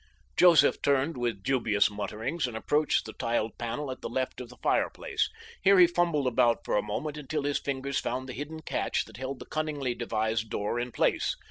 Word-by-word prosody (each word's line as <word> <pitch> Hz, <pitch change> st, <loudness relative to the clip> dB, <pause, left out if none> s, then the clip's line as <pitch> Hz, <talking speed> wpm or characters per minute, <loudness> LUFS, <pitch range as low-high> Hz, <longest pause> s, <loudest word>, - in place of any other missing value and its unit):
Joseph 165 Hz, -6 st, +6 dB
turned 140 Hz, +3 st, +2 dB
with 120 Hz, -5 st, -2 dB
dubious 110 Hz, -6 st, +2 dB
mutterings 110 Hz, -, -3 dB
and 115 Hz, -2 st, -5 dB
approached 150 Hz, +6 st, +1 dB
the 110 Hz, -, -7 dB
tiled 115 Hz, -1 st, -1 dB
panel 130 Hz, +4 st, -3 dB
at 130 Hz, -, -8 dB
the -, -, -4 dB
left 130 Hz, -1 st, -2 dB
of 125 Hz, -, -8 dB
the 125 Hz, -, -14 dB
fireplace. -, -, 0 dB, 0.3 s
Here 195 Hz, +1 st, +6 dB
he 180 Hz, -, +9 dB
fumbled 170 Hz, -4 st, +1 dB
about 120 Hz, -2 st, +2 dB
for -, -, 0 dB
a 105 Hz, -, +3 dB
moment 150 Hz, +8 st, -4 dB
until 150 Hz, 0 st, -3 dB
his 145 Hz, 0 st, 0 dB
fingers 140 Hz, 0 st, -2 dB
found 130 Hz, +2 st, -3 dB
the 125 Hz, -, -6 dB
hidden 155 Hz, +4 st, -6 dB
catch -, -, -1 dB
that 110 Hz, -1 st, -13 dB
held 130 Hz, +1 st, -4 dB
the -, -, -10 dB
cunningly 150 Hz, -5 st, -2 dB
devised 110 Hz, -1 st, -1 dB
door 105 Hz, +4 st, -1 dB
in 120 Hz, +1 st, -3 dB
place. -, -, +1 dB
130 Hz, 200 wpm, -29 LUFS, 115-150 Hz, 0.3 s, he